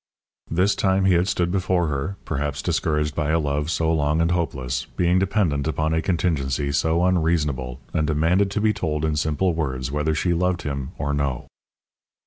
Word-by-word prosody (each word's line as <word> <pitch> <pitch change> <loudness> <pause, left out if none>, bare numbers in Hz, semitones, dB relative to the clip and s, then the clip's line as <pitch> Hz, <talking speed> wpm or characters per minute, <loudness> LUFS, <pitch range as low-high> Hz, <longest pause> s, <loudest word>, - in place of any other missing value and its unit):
This 90 +5 +2
time 95 0 +1
he 95 - +5
had 85 +2 +2
stood 90 -3 0
before 95 -2 +1
her, 75 +5 -2
perhaps 70 0 -3
discouraged 75 -3 0
by 75 0 -1
a 80 - +3
love 75 -1 -1
so 80 -1 +1
long 75 0 +1
and 85 +1 +2
hopeless, 70 -7 -2
being 90 +1 +3
dependent 95 -7 0
upon 80 0 0
a 80 - +1
contingency 75 -6 0
so 80 +4 +2
unreasonable, 75 -8 0
and 75 - +1
demanded 85 +6 +2
to 100 +2 -2
be 110 0 +3
told 75 -4 -2
in 80 -1 0
simple 80 +4 +1
words 65 -5 -2
whether 75 +2 0
she 85 +3 +1
loved 90 +1 0
him 70 -3 -3
or 70 +1 -2
no. 70 -4 -1
80 Hz, 180 wpm, -23 LUFS, 75-90 Hz, -, he